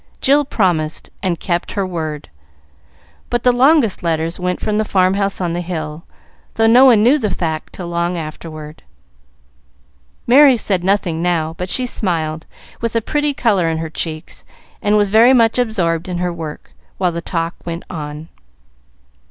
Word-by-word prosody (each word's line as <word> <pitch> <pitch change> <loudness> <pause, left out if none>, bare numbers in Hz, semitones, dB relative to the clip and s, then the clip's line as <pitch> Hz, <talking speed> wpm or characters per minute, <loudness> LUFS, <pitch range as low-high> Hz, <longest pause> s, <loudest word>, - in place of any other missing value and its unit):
Jill 285 +2 +3
promised, 170 - -1
and 180 -4 -1
kept 175 -2 -2
her 200 -2 -1
word; 160 -5 -5 1.0
but 240 -1 -1
the 250 - +5
longest 255 -3 +3
letters 165 0 -1
went 180 0 -2
from 215 0 -1
the - - +2
farm 185 -3 +2
house 195 0 -1
on 175 -2 -1
the 175 - -2
hill, 165 -2 -5 0.5
though 225 - +2
no 245 +4 +7
one 230 -5 +6
knew 270 +6 +4
the 215 -5 -1
fact 160 -4 -3
till 180 - -7
long 170 +1 -1
afterward. 155 -1 -8 1.4
Merry 265 +1 +6
said 190 -4 -1
nothing 185 -4 0
now, 165 -2 0
but 180 +2 -5
she 255 - 0
smiled, 160 -8 -2 0.3
with 230 0 -2
a - - +4
pretty 295 +3 -1
color 205 - +1
in 160 - -1
her 160 -1 -5
cheeks, 160 0 -5 0.4
and 210 +1 +2
was 205 -1 +2
very 230 +5 +6
much 230 -1 +3
absorbed 185 -8 0
in 180 - -3
her 180 0 -2
work, 160 -3 -8 0.3
while 180 -2 +1
the 170 0 -4
talk 165 0 -2
went 170 0 -5
on. 150 -1 -7
180 Hz, 170 wpm, -18 LUFS, 165-220 Hz, 1.4 s, no